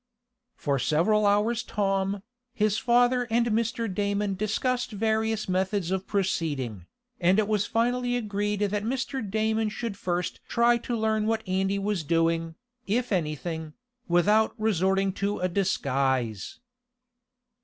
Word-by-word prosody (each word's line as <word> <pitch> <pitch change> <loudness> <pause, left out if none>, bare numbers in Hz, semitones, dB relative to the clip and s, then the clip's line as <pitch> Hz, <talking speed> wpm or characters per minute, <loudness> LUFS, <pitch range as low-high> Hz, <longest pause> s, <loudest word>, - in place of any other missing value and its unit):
For 140 -2 -1
several 205 +10 +2
hours 215 +4 +2
Tom, 195 -2 -1 0.3
his 210 -1 +1
father 245 +1 +3
and 235 +1 +2
Mr. 230 0 0
Damon 200 +1 -1
discussed 240 +6 -1
various 220 0 0
methods 190 0 0
of 190 0 -2
proceeding, 145 - -2 0.3
and 185 +2 +3
it 215 -2 +2
was 210 -2 +1
finally 245 +2 +1
agreed 205 -2 -2
that 205 0 0
Mr. 265 +3 -2
Damon 220 +1 0
should 220 0 -4
first 180 -2 -2
try 235 0 +3
to 240 0 -3
learn 220 -1 +1
what 225 -1 -1
Andy 190 +1 0
was 200 -3 -1
doing, 165 +1 +1 0.3
if 240 +4 0
anything, 160 -2 -2 0.3
without 210 +7 +3
resorting 195 -2 +1
to 200 +1 -1
a 185 - 0
disguise. 135 - -1
205 Hz, 130 wpm, -27 LUFS, 180-220 Hz, 0.3 s, father